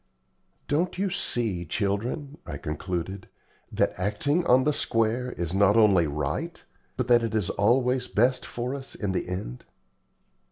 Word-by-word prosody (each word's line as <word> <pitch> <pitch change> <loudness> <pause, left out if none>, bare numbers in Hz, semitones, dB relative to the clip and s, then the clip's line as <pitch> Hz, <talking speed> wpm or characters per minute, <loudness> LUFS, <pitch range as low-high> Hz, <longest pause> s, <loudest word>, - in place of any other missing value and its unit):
"Don't 165 +6 0
you 195 0 0
see, 110 - -1
children," 115 - -2
I 75 -4 -6
concluded, 90 +5 -4 0.4
"that - - +1
acting 140 - 0
on 130 +1 +5
the 150 - +2
square 115 +1 0
is 85 0 -4
not 100 +2 +4
only 100 -7 +5
right, 75 +1 -3 0.3
but 125 -1 -1
that 120 -1 +5
it 115 -1 -2
is 105 -5 0
always 125 +4 +2
best 125 +3 +2
for 120 +2 -4
us 135 -1 -7
in 100 -2 -2
the 95 - -2
end?" 90 -10 -5
110 Hz, 150 wpm, -26 LUFS, 95-125 Hz, 0.4 s, on